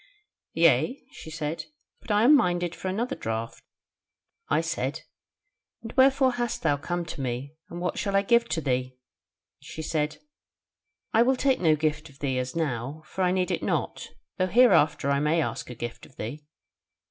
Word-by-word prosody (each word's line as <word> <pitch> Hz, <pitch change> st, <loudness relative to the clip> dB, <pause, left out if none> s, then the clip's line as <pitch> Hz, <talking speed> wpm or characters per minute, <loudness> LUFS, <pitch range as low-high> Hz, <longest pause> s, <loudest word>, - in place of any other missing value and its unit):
"'Yea,' 260 Hz, +3 st, +3 dB
she -, -, -10 dB
said; 155 Hz, 0 st, -4 dB, 0.4 s
'but -, -, -15 dB
I 210 Hz, +1 st, +3 dB
am 290 Hz, +5 st, +8 dB
minded 175 Hz, -, +1 dB
for -, -, -6 dB
another 235 Hz, +8 st, -1 dB
draught.' 115 Hz, +1 st, -4 dB, 0.9 s
I -, -, +3 dB
said: -, -, -3 dB, 0.8 s
'And 225 Hz, -, -7 dB
wherefore 265 Hz, 0 st, +5 dB
hast 240 Hz, 0 st, -3 dB
thou 145 Hz, -, +2 dB
come 175 Hz, +4 st, -3 dB
to 165 Hz, -3 st, -6 dB
me, 130 Hz, +3 st, -3 dB, 0.2 s
and 170 Hz, -, -7 dB
what 180 Hz, 0 st, -2 dB
shall 200 Hz, -1 st, -1 dB
I 195 Hz, -, +4 dB
give 235 Hz, +3 st, +3 dB
to 160 Hz, -, -1 dB
thee?' 130 Hz, -2 st, -1 dB, 0.6 s
She 160 Hz, -, -8 dB
said, 150 Hz, -1 st, -1 dB, 1.0 s
'I 225 Hz, -, +5 dB
will 260 Hz, +3 st, +4 dB
take 265 Hz, 0 st, +2 dB
no 160 Hz, -3 st, +4 dB
gift 155 Hz, +1 st, -1 dB
of 140 Hz, -, -18 dB
thee 135 Hz, -2 st, -1 dB
as 125 Hz, +2 st, -4 dB
now, 145 Hz, -1 st, -2 dB
for 190 Hz, -, -5 dB
I 180 Hz, -, +3 dB
need 185 Hz, -1 st, 0 dB
it -, -, -1 dB
not, -, -, -2 dB, 0.3 s
though 185 Hz, -, +2 dB
hereafter 185 Hz, -, +4 dB
I 140 Hz, -, +2 dB
may 150 Hz, +3 st, +2 dB
ask 155 Hz, -, -3 dB
a 125 Hz, -, -7 dB
gift 120 Hz, 0 st, -7 dB
of 130 Hz, -, -23 dB
thee. 145 Hz, +7 st, -7 dB
165 Hz, 180 wpm, -27 LUFS, 140-215 Hz, 1.0 s, am